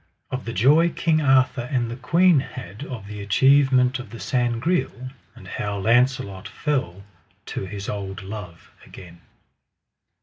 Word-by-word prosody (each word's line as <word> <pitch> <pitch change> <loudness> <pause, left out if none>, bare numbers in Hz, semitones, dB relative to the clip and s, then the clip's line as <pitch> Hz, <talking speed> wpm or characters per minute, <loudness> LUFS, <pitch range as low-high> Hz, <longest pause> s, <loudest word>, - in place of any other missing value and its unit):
Of 130 0 -4
the 115 - -4
joy 145 - +4
King 160 -1 +1
Arthur 130 -3 +2
and 120 -4 0
the - - -4
queen 170 +5 +4
had 125 -3 -8
of 115 -6 -7
the 105 0 -8
achievement 130 +4 +3
of 125 - -9
the 115 - -10
Sangreal; 130 +1 -1 0.2
and - - -13
how 100 0 -4
Launcelot 120 -2 +1
fell 100 - -3 0.4
to 95 - -5
his 100 +1 -7
old 95 -1 -5
love 95 -4 -9
again. 85 -2 -13
120 Hz, 140 wpm, -23 LUFS, 100-135 Hz, 0.4 s, joy